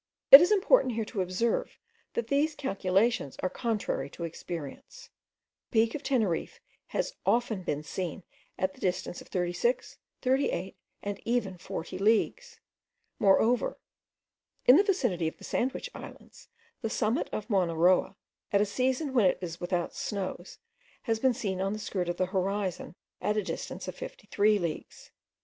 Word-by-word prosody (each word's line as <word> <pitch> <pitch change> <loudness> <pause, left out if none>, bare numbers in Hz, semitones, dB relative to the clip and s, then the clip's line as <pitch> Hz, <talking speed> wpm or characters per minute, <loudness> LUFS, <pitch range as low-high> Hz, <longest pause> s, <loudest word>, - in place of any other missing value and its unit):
It 275 - +14
is 355 - +3
important 410 - +4
here 225 -1 -1
to 210 -2 -3
observe, 185 +6 -1 0.4
that 470 - 0
these 295 +2 +1
calculations 195 - 0
are 185 - 0
contrary 210 - -2
to 170 - -8
experience. 170 - -7 0.6
The - - -26
peak 230 - -8
of 300 - -4
Teneriffe 220 - -1 0.3
has - - -2
been - - -32
often 195 -11 0
seen 180 +4 -5 0.3
at 190 0 -1
the - - -19
distance 180 -1 -2
of - - -14
36, 180 - -1 0.2
38, 255 -8 0 0.3
and 205 -1 -4
even 230 -5 0
at 175 - -16
40 185 0 -5
leagues. 225 - +1 0.6
Moreover, 220 +5 +3 0.9
in 250 - +9
the 380 - +6
vicinity 245 - +1
of 160 - -5
the - - -16
Sandwich 265 - -2
Islands, - - -12 0.3
the 225 - -2
summit 230 +5 0
of 215 - -4
Mowna 185 -7 +1
Roa, 180 +3 +3 0.4
at 200 - +4
a 205 - +3
season 260 +6 -1
when 230 -7 +5
it - - +1
was 170 -2 -6
without 175 -1 -1
snows, 190 -3 -5 0.5
has 225 -3 0
been 260 0 +3
seen 190 -4 -2
on 195 +1 0
the - - -3
skirt 185 -4 -3
of 175 - -2
the 185 - +2
horizon, 190 -1 -2 0.3
at 210 +3 0
the 210 - +1
distance - - -5
of - - -4
53 215 - 0
leagues. 170 -5 -5
205 Hz, 160 wpm, -29 LUFS, 180-250 Hz, 0.9 s, It